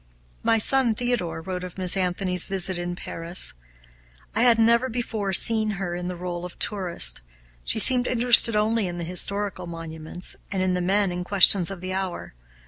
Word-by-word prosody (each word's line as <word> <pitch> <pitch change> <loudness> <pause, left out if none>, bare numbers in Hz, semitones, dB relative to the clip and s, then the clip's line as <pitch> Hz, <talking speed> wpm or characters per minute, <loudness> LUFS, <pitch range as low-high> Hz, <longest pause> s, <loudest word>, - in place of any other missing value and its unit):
My 225 - +1
son 240 0 +2
Theodore 230 -9 -4
wrote 180 0 -6
of 180 0 -10
Miss 185 -1 0
Anthony's 180 -1 -1
visit 190 -1 -1
in 175 0 -6
Paris: 170 +1 -3 0.8
"I 220 - -1
had 240 -2 +3
never 235 +3 +1
before 220 -4 -5
seen 220 +3 +5
her 185 -3 -5
in 175 0 -6
the 180 - -6
role 175 0 -7
of 180 - -10
tourist. 185 - 0 0.4
She - - -2
seemed 250 -1 +7
interested 235 -2 +6
only 215 -1 -1
in 175 0 -7
historical 180 +2 -3
monuments, 165 +1 -6 0.2
and 190 -1 -2
in 185 -1 -1
the 180 - -3
men 195 +1 -1
and 180 0 -6
questions 190 -1 +4
of 195 -3 -9
the 185 0 -6
hour. 190 -2 -6
185 Hz, 175 wpm, -22 LUFS, 175-220 Hz, 0.8 s, seemed